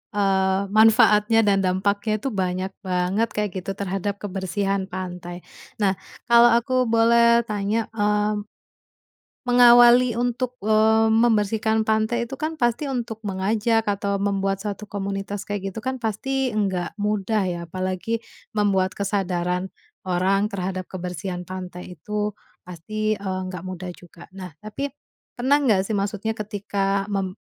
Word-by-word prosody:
eee, 195 -1 +1
manfaatnya 220 0 +5
dan 200 -1 +3
dampaknya 200 +3 0
itu 240 +5 -3
banyak 185 -1 -2 0.2
banget 185 +5 +1
kayak 210 -2 -1
gitu 195 +2 -5
terhadap 195 0 -3
kebersihan 195 0 -2
pantai. 180 -1 -7 0.4
Nah, 195 -1 +1 0.3
kalau 235 0 +8
aku 255 +1 +1
boleh 235 +1 +4
tanya, 210 +1 -2
mmm, 210 -1 +1 1.1
mengawali 245 0 +7
untuk, 245 +1 -1
eee, 220 +1 +3
membersihkan 220 -1 +2
pantai 220 +2 0
itu 270 - -6
kan 315 +2 -3
pasti 240 +5 +1
untuk 230 -5 -4
mengajak 210 +3 0
atau 200 0 -1
membuat 195 -1 0
suatu 210 0 -5
komunitas 200 0 -5
kayak 195 -2 -3
gitu 220 - -6
kan 260 0 -3
pasti 255 +3 -2
nggak 190 -4 -1
mudah 210 0 0
ya 175 - -3
apalagi, 185 +6 -3 0.3
membuat 195 -3 +1
kesadaran, 180 -2 -2 0.3
orang 190 +3 +1
terhadap 185 -1 -3
kebersihan 180 0 -5
pantai 180 -1 -7
itu, 210 -1 -3 0.3
pasti, 215 +5 -2
eee, 190 -2 -4
nggak 180 -2 -7
mudah 185 -1 -6
juga. 170 -1 -15
Nah, 185 -2 -8
tapi 230 +7 -5 0.4
pernah 260 +3 +3
nggak 215 -8 +3
sih 220 - -1
maksudnya 210 +2 -2
ketika 200 -1 -2
mem 190 -1 -2
205 Hz, 130 wpm, -23 LUFS, 190-225 Hz, 1.1 s, kalau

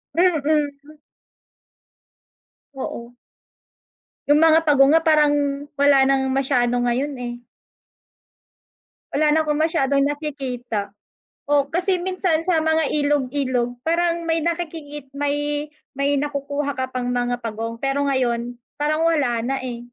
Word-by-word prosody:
Mm. 300 -3 0 1.8
Oo. 245 -2 -7 1.1
Yung 295 +2 +5
mga 320 0 +4
pagong 275 -1 +5
nga 325 - +6
parang 305 -2 +4 0.5
wala 280 -1 +5
nang 265 0 +2
masyado 250 -3 +1
ngayon, 255 +4 0
eh. 245 -1 -5 1.8
Wala 300 +1 +3
na 315 - +3
akong 300 - 0
masyadong 280 -4 +2
nakikita. 260 -8 -3 0.6
Oh, 285 -1 +2
kasi 365 +2 0
minsan 365 -2 0
sa 340 -2 +2
mga 320 -2 +2
ilog-ilog 265 -4 0
parang 340 +1 0
may 330 0 0
nakikikit 315 -4 -4
may 290 +1 -2 0.2
may 280 +1 0
nakukuha 285 0 -2
ka 260 -1 -3
pang 250 -1 -3
mga 245 0 0
pagong 225 0 -4
pero 275 +3 -1
ngayon 245 -3 -1 0.2
parang 310 +2 +1
wala 280 -9 +1
na, 270 +2 -1
eh. 240 -2 -5
285 Hz, 115 wpm, -22 LUFS, 260-310 Hz, 1.8 s, nga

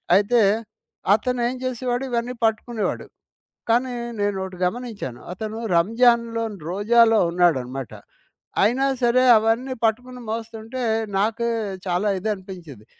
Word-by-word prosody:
అయితే 215 +4 +4 0.7
అతనేం 245 +3 0
జేసేవాడు 250 0 -2
ఇవన్నీ 240 +1 -1
పట్టుకునేవాడు. 220 0 -1 0.6
కానీ 245 +2 +2 0.3
నేనోటి 190 -2 -2
గమనించాను. 215 - -5
అతను 215 +3 -5 0.2
రంజాన్‌లోను 230 +2 +2
రోజాలో 225 +3 +4
ఉన్నాడనమాట. 135 -8 0 0.7
అయినా 250 +6 +2 0.2
సరే 240 +2 +4
అవన్నీ 230 +4 0
పట్టుకుని 250 +3 -2
మోస్తుంటే 225 +2 -5 0.3
నాకే 230 +4 0 0.4
చాలా 180 +4 0
ఇదనిపించింది. 185 - -6
225 Hz, 90 wpm, -23 LUFS, 195-240 Hz, 0.7 s, అయితే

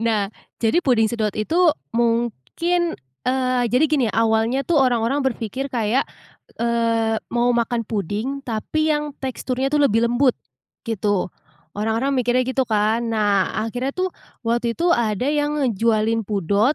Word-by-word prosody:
Nah, 215 -3 0 0.3
jadi 225 +9 +3
puding 225 -5 +3
sedot 215 -4 -1
itu 320 +10 +2 0.2
mungkin 240 - 0 0.3
eee, 255 -1 +1
jadi 250 +5 +4
gini, 275 -6 +2
awalnya 225 +4 +2
tuh 325 +1 +2
orang-orang 250 +1 +2
berpikir 255 +2 -2
kayak, 235 +1 0 0.5
eee, 230 -1 +1 0.2
mau 240 +1 +3
makan 235 0 0
puding 215 +7 -3
tapi 310 +7 -1
yang 295 0 -2
teksturnya 260 0 -2
tuh 295 -1 +3
lebih 230 -1 +3
lembut, 245 +2 +3 0.5
gitu. 205 -3 0 0.5
Orang-orang 225 +6 0
mikirnya 250 0 +2
gitu 260 0 +1
kan. 220 +2 +1
Nah 205 -4 +1
akhirnya 250 +4 -3
tuh 370 0 -1 0.3
waktu 235 0 0
itu 345 +5 +1
ada 230 - +1
yang 295 0 0
ngejualin 225 -1 +1
pudot, 205 - +1
235 Hz, 135 wpm, -22 LUFS, 220-265 Hz, 0.5 s, jadi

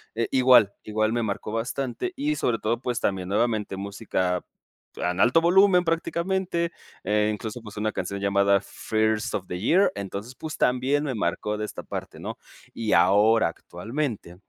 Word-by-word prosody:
Eh, 115 - 0
igual, 125 -6 +6
igual 110 +1 0
me 120 - 0
marcó 105 0 -3
bastante 125 - -3
y 300 +2 -1
sobre 115 -2 +1
todo 115 +2 -1
pues 125 -2 -2
también 95 -2 -1
nuevamente 105 -1 0
música, 95 -2 -2 0.6
ah, 90 - +1
en 90 - -5
alto 130 +7 +5
volumen 180 +1 +5
prácticamente 170 +1 -1 0.3
e 105 +1 +2
incluso 110 +2 -6
pues 105 -2 -11
una 110 +1 0
canción 100 0 -4
llamada 100 0 +3
First 110 -1 -1
Of 95 - -3
The 90 - -4
Year. 180 - +3
Entonces 100 +5 -6
pues 155 -3 -6
también 130 +4 +2
me 135 -3 -2
marcó 105 +1 -2
de 105 - -2
esta - - -8
parte - - -6
¿no? - - -5 0.4
Y 110 -2 -1
ahora, 105 +2 +5
actualmente, 105 - -5
110 Hz, 165 wpm, -25 LUFS, 100-135 Hz, 0.6 s, igual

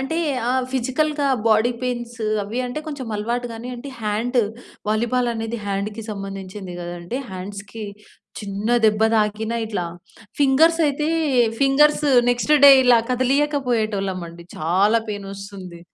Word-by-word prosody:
అంటే 270 +5 -2 0.3
ఆ! - - +2 0.2
ఫిజికల్‌గా 280 +3 0 0.2
బాడీ 220 +3 +4
పెయిన్స్ 240 -1 -3 0.3
అవి 215 +5 -5
అంటే 245 +5 -4
కొంచెం 285 -5 -5
అలవాటు 240 +4 -2
గాని 230 +2 -7
అంటే 265 +4 -8
హాండ్ 225 +4 -1 0.5
వాలీబాల్ 240 +3 +1
అనేది 225 +1 -4
హ్యాండ్‌కి 205 +3 -3
సంబంధించింది 195 -1 -7
గదండి! 175 +6 -5
హ్యాండ్స్‌కి 200 +3 -7 0.6
చిన్న 200 +1 -4 0.2
దెబ్బ 215 0 +2
తాకిన 215 +1 0
ఇట్లా 200 -5 -3 0.5
ఫింగర్స్ 320 +5 +4
అయితే 295 +1 -1 0.5
ఫింగర్స్ 295 +2 +4 0.3
నెక్స్ట్ 245 +5 +2
డే 280 - +11
ఇలా 245 -2 +6
కదిలియక 280 +4 +1
పోయేటోళ్ళం 205 -5 -1
అండి. 170 +1 -12
చాలా 195 +8 +2
పెయినొస్తుంది. 195 -3 -8
225 Hz, 125 wpm, -22 LUFS, 200-255 Hz, 0.6 s, డే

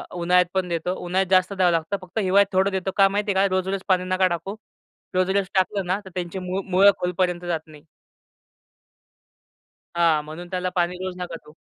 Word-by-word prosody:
उन्हाळ्यात 180 +1 +3
पण 190 -1 0
देतो. 170 +2 -2
उन्हाळ्यात 185 +1 0
जास्त 185 +1 +3
द्यावं 185 -2 +3
लागतं. 165 +4 -1
फक्त 185 +3 -12
हिवाळ्यात 200 +1 +3
थोडं 190 +1 +2
देतो 190 0 -2
का 195 0 +7
माहिती 205 +1 -1
आहे 195 +1 +4
का 185 - -1
रोज-रोज 190 +1 -1
पाणी 185 -1 +2
नका 185 0 +3
टाकू. 180 +4 -4 0.6
रोज-रोज 190 +1 +1
टाकलं 190 0 +1
ना 185 +3 0
तर - - -9
त्यांची 180 +1 -4
मूळ 185 +1 -3
मुळं 195 +2 +7
खोलपर्यंत 180 0 -1
जात 170 -2 -1
नाही. 150 -1 -15 2.1
हां. 165 -3 +3
म्हणून 160 +4 -9
त्याला 185 0 -1
पाणी 180 0 0
रोज 185 0 -5
नका 180 -1 -5
देऊ. 150 - -14
185 Hz, 185 wpm, -23 LUFS, 175-190 Hz, 2.1 s, का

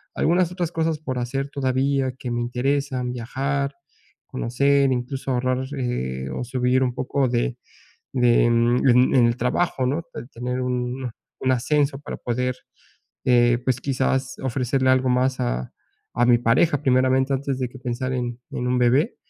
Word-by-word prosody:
algunas 175 +1 +2
otras 175 -2 -3
cosas 160 -2 -1
por 130 -5 -4
hacer 135 +3 -3
todavía 135 -1 0
que 125 - -5
me 120 0 -1
interesan, 125 +1 -1
viajar, 140 +3 -2 0.5
conocer, 140 +2 +2
incluso, 130 +2 -2
ahorrar, 130 +1 0
eh, 65 - -3
o - - -3
subir 125 +1 +1
un 125 -1 0
poco 130 0 0
de, 120 +1 -1 0.6
de, 120 -2 +4
mm, 120 +2 +3
en 125 +2 +5
en 120 -2 +6
el 120 +1 +1
trabajo, 130 +2 0
¿no?, 155 +6 -1 0.3
tener 125 +2 -3
un, 125 0 -2 0.3
un 130 - +1
ascenso 140 +2 +1
para - - -6
poder, 125 +1 -1 0.7
eh, 120 -1 +4
pues, 125 -1 0
quizás, 135 -1 -1
ofrecerle 130 +1 0
algo 130 0 +3
más 130 +1 +1
a, - - -2 0.4
a 120 - +3
mi 120 -1 +5
pareja, 135 +6 +2
primeramente, 130 +1 +2
antes 135 0 -2
de 125 - -1
que 130 - -12
pensar 130 +1 -3
en 120 -1 -3
en 125 - -3
un 125 0 +1
bebé. 130 - +2
130 Hz, 160 wpm, -23 LUFS, 125-135 Hz, 0.7 s, en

